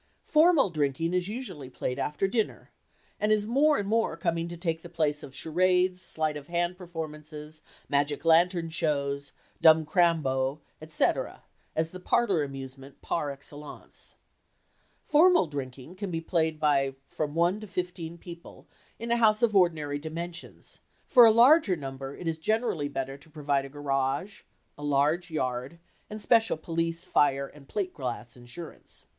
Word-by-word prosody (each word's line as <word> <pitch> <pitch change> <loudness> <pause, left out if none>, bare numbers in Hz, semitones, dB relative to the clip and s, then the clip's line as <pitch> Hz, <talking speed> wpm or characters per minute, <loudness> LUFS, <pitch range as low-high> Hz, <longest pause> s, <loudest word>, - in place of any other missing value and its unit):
"Formal 310 - +4
drinking" 155 +2 -1
is 180 0 0
usually 195 - -6
played 125 0 -4
after 150 +6 0
dinner 220 +2 -2 0.5
and 210 +1 +1
is 210 -1 +3
more 285 +6 +3
and 200 - -2
more 225 -4 +1
coming 170 0 -1
to 175 0 -7
take 165 -1 -2
the 175 - -10
place 150 -3 0
of 135 - -10
charades, 180 +4 +1
sleight 155 -4 -2
of 145 -1 -8
hand 175 +1 -1
performances, 155 -3 -8 0.3
magic 145 +2 0
lantern 170 +1 +4
shows, 140 -3 -1 0.3
"dumb 160 -1 +6
crambo," 150 -5 +1 0.2
et 155 0 -11
cetera, - - 0 0.3
as 160 0 0
the 185 - -8
parlor 195 -3 +2
amusement 135 0 -9
par 150 -3 -1
excellence. 145 +1 -10 0.9
"Formal 345 - +5
drinking" 140 0 -7
can 200 0 -5
be 165 -2 -2
played 160 -2 0
by 140 -3 +2
from 150 -1 -4
one 175 +4 +2
to 215 - -9
fifteen 180 -3 -4
people 170 0 -12 0.3
in 235 0 -5
a 235 - +3
house 215 -2 +3
of 220 -3 +3
ordinary 155 -6 +2
dimensions; 165 +3 -8 0.3
for 240 -2 +8
a - - +7
larger 240 - +6
number 135 -2 -7
it 175 - -6
is 160 -1 -2
generally 215 -5 0
better 135 -1 -4
to 160 - -19
provide 145 -3 -1
a - - -9
garage, 140 +5 -2 0.4
a - - -8
large 145 +5 +1
yard, 130 0 -3 0.3
and 215 - -6
special 225 -6 +3
police, 165 +1 -3
fire 140 -1 +2
and 140 0 -15
plate 190 0 -3
glass 120 -3 -5
insurance. 125 +7 -11
160 Hz, 155 wpm, -28 LUFS, 145-185 Hz, 0.9 s, for